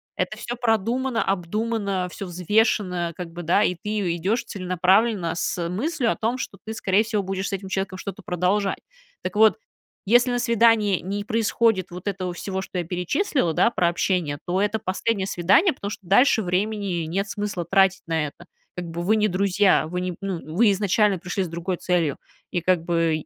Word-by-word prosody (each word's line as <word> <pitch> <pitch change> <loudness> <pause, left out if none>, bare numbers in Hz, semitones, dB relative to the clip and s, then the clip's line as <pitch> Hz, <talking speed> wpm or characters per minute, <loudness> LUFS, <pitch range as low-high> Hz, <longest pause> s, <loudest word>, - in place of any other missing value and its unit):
Это - - -2
всё 240 - -5
продумано, 235 +2 0
обдумано, 200 +1 -1
всё 195 - -7
взвешено, 180 -1 +1
как 175 -2 -6
бы, 170 +1 -7
да, 175 +5 +3
и 180 - +2
ты 180 +4 -8
и 195 -5 -1
идёшь 200 +8 0
целенаправленно 185 0 +1
с 170 0 -2
мыслью 240 - -1
о - - -1
том, 230 +3 -1
что - - -6
ты, 220 +1 -6
скорее 200 0 +2
всего, 215 -2 -1
будешь 190 +1 -3
с - - -6
этим 195 0 -4
человеком 190 0 -2
что-то 200 +1 -7
продолжать. 185 +3 0 0.5
Так 185 +1 -4
вот, 220 0 +5 0.5
если 240 +4 +5
на 245 - 0
свидании 225 -5 +3
не 200 +3 -3
происходит 220 -2 +1
вот 180 +2 -9
этого 185 -2 -2
всего, 190 +2 -4
что 190 - -7
я 175 - 0
перечислила, 180 - 0
да, 230 - +3
про 175 -7 +1
общение, 170 -4 0
то 185 +2 0
это 210 +2 +1
последнее 195 +1 -1
свидание, 195 - +3
потому 200 -6 -6
что 205 -1 -8
дальше 220 +3 +4
времени 190 -1 -1
нет 195 +6 -2
смысла 200 -4 -3
тратить 190 +1 +3
на 160 -2 0
это. 160 +4 -13 0.3
Как 180 - -4
бы 170 0 -5
вы 200 +5 +2
не 215 -1 +2
друзья, 190 -2 +2
вы 180 +2 -3
не 180 -1 -3
ну, 195 -3 -3 0.2
вы 225 +3 +5
изначально 205 0 +2
пришли 180 +2 -3
с - - -4
другой 170 +2 -3
целью, 170 -6 0 0.3
и 175 - -1
как 180 -1 +2
бы 165 -2 +1
195 Hz, 190 wpm, -24 LUFS, 180-215 Hz, 0.5 s, вот